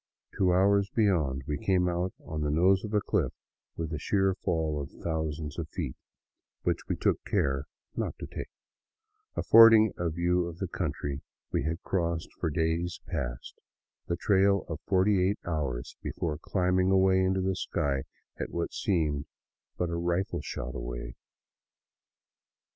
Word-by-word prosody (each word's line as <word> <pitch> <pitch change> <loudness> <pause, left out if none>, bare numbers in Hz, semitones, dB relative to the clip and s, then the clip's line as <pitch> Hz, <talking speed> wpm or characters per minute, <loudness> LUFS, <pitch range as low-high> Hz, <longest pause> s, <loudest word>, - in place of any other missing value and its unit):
Two 95 -2 +3
hours 100 +2 +4
beyond, 80 - +1
we 75 0 -2
came 90 -2 +2
out 90 +1 0
on 80 -1 -4
the 75 - 0
nose 95 +6 +4
of 105 - -5
a 105 -1 +2
cliff - - 0 0.5
with 80 -1 -3
a 75 - -2
sheer 95 +3 +2
fall 80 -5 -1
of 70 - -6
thousands 80 -2 -2
of 80 -2 -4
feet 75 -9 -4 0.4
— - - -60
which - - -1
we - - 0
took - - +1
care 70 0 0 0.3
not - - -2
to - - -6
take - - -7 0.5
— 430 0 -48
affording 110 -3 +8
a 85 -1 +1
view 85 +2 +1
of 85 -1 -7
the 95 - -3
country 70 -5 -3 0.3
we - - 0
had 80 +2 -2
crossed 85 -3 -1
for - - 0
days 80 +2 -1
past, - - -5 0.5
the 85 - -1
trail 100 0 +3
of 80 -2 -4
forty 95 0 +3
eight 100 +3 +1
hours 70 -8 -3
before 75 -3 -3
climbing 90 +1 +1
away 95 0 +4
into 95 0 +2
the 95 0 0
sky 70 -6 -1 0.4
at - - -3
what - - -3
seemed 75 -6 0 0.5
but 90 -1 -1
a - - -1
rifle 85 +3 -1
shot 65 +1 -5
away. - - -5
85 Hz, 160 wpm, -29 LUFS, 75-95 Hz, 0.5 s, affording